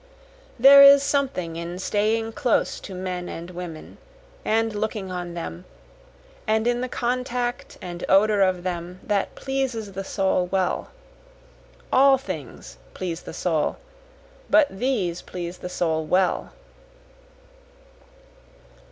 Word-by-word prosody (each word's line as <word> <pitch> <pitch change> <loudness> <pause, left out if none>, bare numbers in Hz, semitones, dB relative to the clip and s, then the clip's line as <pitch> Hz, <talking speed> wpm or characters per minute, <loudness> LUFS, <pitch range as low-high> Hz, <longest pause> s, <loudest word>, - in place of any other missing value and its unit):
There 275 +3 +9
is 280 0 +9
something 270 - -1
in 170 +1 -5
staying 215 +4 0
close 255 -4 0
to 190 - -9
men 180 -1 -4
and 170 +2 -7
women 175 -3 -8 0.4
and 225 0 +1
looking 210 -2 -3
on 175 -1 -5
them, 90 - -6 0.8
and 220 +1 +2
in 240 0 +1
the 255 - -3
contact 245 0 -2
and 175 -1 -6
odor 205 +1 +4
of 185 -2 +2
them, 180 0 -4
that 205 -2 -1
pleases 260 -6 -3
the 195 +1 -5
soul 190 -2 0
well, 185 0 -1 1.0
All 270 0 +6
things 145 - -8 0.2
please 175 -2 -4
the - - -9
soul, 160 -4 0 0.7
but 310 - +6
these 205 -9 -1
please 175 0 -7
the 180 - -6
soul 160 -3 -1
well. 180 +3 +1
190 Hz, 120 wpm, -24 LUFS, 175-240 Hz, 1.0 s, There